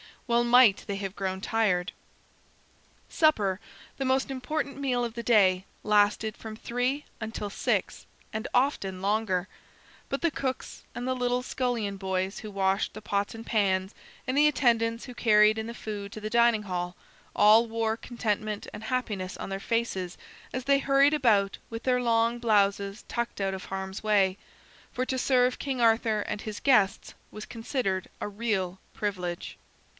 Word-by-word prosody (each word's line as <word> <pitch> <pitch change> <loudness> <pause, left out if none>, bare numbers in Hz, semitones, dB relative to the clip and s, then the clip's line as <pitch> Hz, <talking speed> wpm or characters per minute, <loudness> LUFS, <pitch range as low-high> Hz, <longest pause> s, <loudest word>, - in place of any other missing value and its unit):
Well 235 -1 +2
might 240 -4 +6
they 200 - -2
have 195 0 -5
grown 190 -1 -3
tired. 195 -5 +1 1.2
Supper, 210 - +2 0.4
the 270 - -2
most 265 +1 +1
important 275 +2 -3
meal 255 -3 0
of 235 -2 -3
the 235 - -4
day, 195 -6 +4 0.2
lasted 210 +1 +2
from 220 -1 -8
three 250 +6 -1 0.2
until 220 -2 -4
six, - - -1 0.3
and 220 0 -3
often 245 -8 +1
longer. 200 -2 0 0.6
But 275 - -3
the 335 - +2
cooks, 265 -3 -4
and 245 - -4
the 260 - 0
little 250 0 0
scullion 240 -6 -2
boys 190 0 -2
who 215 - -7
washed 195 0 0
the 215 - -8
pots 200 0 -1
and 225 0 -9
pans, 190 -3 +1 0.3
and 255 -1 -1
the 300 +1 +6
attendants 230 -5 +2
who 250 - -9
carried 215 -2 +4
in 220 0 -3
the 235 - -5
food 205 -3 -6
to 215 - -8
the 215 - -3
dining 235 -2 +4
hall, 180 -2 -3 0.4
all 220 +3 +6
wore 225 0 -1
contentment 215 -3 -3
and 220 - -8
happiness 210 -7 -2
on - - -6
their 195 0 -3
faces 195 -5 -2 0.4
as 255 - -3
they 275 +1 +3
hurried 275 +1 +4
about 215 -9 +3
with 225 0 -6
their 250 -1 +2
long 230 0 +2
blouses 200 -2 +1
tucked 235 -3 -3
out 195 0 0
of 190 - -6
harm's 190 0 -5
way; 200 -3 +2 0.6
for 255 -1 -1
to 260 0 -2
serve 250 -1 +2
King 270 -3 -3
Arthur 225 -2 +3
and 205 - -4
his 215 -1 -6
guests 215 -7 +3 0.2
was 215 0 -8
considered 225 -5 -2
a - - -2
real 200 -4 -2 0.2
privilege. 180 -4 -4
220 Hz, 165 wpm, -28 LUFS, 200-245 Hz, 1.2 s, might